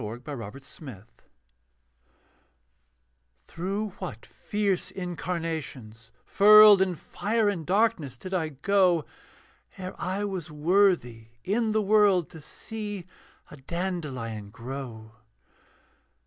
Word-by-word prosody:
THE 110 +1 -5
BEATIFIC 120 -8 -6
VISION 130 - -11 2.4
Through 195 +5 -3
what - - -7
fierce 205 -3 -2
incarnations, 160 - -5 0.2
furled 210 -1 +8
In 185 -2 +1
fire 215 +6 -1
and 190 -5 -1
darkness, 185 - +1
did 185 +9 -8
I 165 -4 0
go, 175 +2 +2 0.7
Ere 185 0 -6
I 195 +3 -2
was 190 -5 -5
worthy 150 - +2 0.2
in 220 +4 0
the 215 0 +1
world 200 -4 +3
To 160 - -11
see 205 +3 -7 0.5
a 150 - -10
dandelion 135 - -4
grow? 115 -1 -8
175 Hz, 100 wpm, -27 LUFS, 135-200 Hz, 2.4 s, furled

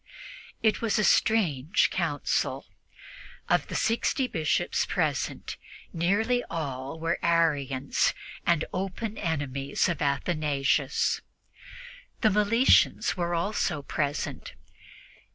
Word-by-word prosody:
It 220 -1 +2
was 225 -3 +1
a 215 - +2
strange 175 - +2
Council. - - -1 0.8
Of - - +2
the - - -6
sixty 235 +4 +1
Bishops 160 -10 0
present, - - -2 0.4
nearly 215 +9 +1
all 140 -1 -4
were 165 +1 -1
Arians 145 -6 +1 0.3
and 170 -2 +2
open 195 +4 -3
enemies 140 -5 -1
of 175 - -2
Athanasius. 145 -1 0 1.0
The 220 - +4
Meletians 210 +5 +3
were 175 -2 -1
also 170 -4 -1
present. 145 0 -3
170 Hz, 95 wpm, -27 LUFS, 145-205 Hz, 1.0 s, The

